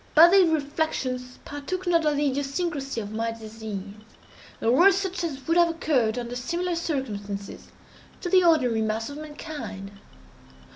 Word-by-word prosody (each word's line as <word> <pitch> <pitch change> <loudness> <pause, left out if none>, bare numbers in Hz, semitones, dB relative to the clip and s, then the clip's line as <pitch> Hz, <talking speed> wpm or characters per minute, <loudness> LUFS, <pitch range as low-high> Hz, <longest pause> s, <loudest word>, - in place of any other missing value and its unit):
But 335 +3 +9
these 380 -3 +6
reflections 280 -5 -2
partook 325 +6 -5
not 335 -3 +3
of 300 - +2
the 295 - +1
idiosyncrasy 275 -1 -2
of 205 -1 -7
my 225 +1 -1
disease, 220 -3 -7 0.8
and 230 - +2
were 360 +9 +7
such 380 -2 -2
as 280 -5 -4
would 330 +1 +3
have 345 -1 +5
occurred, 260 -9 +1
under 245 0 -4
similar 345 +9 -2
circumstances, 205 - -4 0.5
to - - -3
the 370 +1 +5
ordinary 255 -10 +3
mass 220 +3 -2
of 285 - -8
mankind. 295 -10 -7
285 Hz, 150 wpm, -26 LUFS, 230-335 Hz, 0.8 s, But